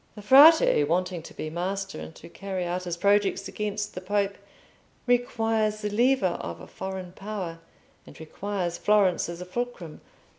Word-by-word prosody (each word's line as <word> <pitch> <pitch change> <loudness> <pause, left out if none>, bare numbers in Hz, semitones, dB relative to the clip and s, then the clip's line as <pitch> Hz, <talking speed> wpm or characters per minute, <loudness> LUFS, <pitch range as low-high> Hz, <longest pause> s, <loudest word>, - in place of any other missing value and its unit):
The 210 - -10
Frate, 280 - +7
wanting 180 +2 -1
to - - -12
be 155 - -5
master, 195 +3 -3
and 160 - -9
to - - -12
carry 190 +1 -5
out 180 +1 -3
his 175 -1 -3
projects 200 +1 +2
against 210 0 -4
the 185 - -6
Pope, 200 +1 -1 0.7
requires 225 -3 +1
the 210 - -2
lever 235 -4 +2
of 85 0 -6
a - - -10
foreign 190 -1 -7
power, 190 -4 -6 0.5
and - - -14
requires 175 +1 -4
Florence 200 -5 +2
as 170 +1 -7
a - - -6
fulcrum. 185 -5 -5
195 Hz, 160 wpm, -26 LUFS, 175-210 Hz, 0.7 s, Frate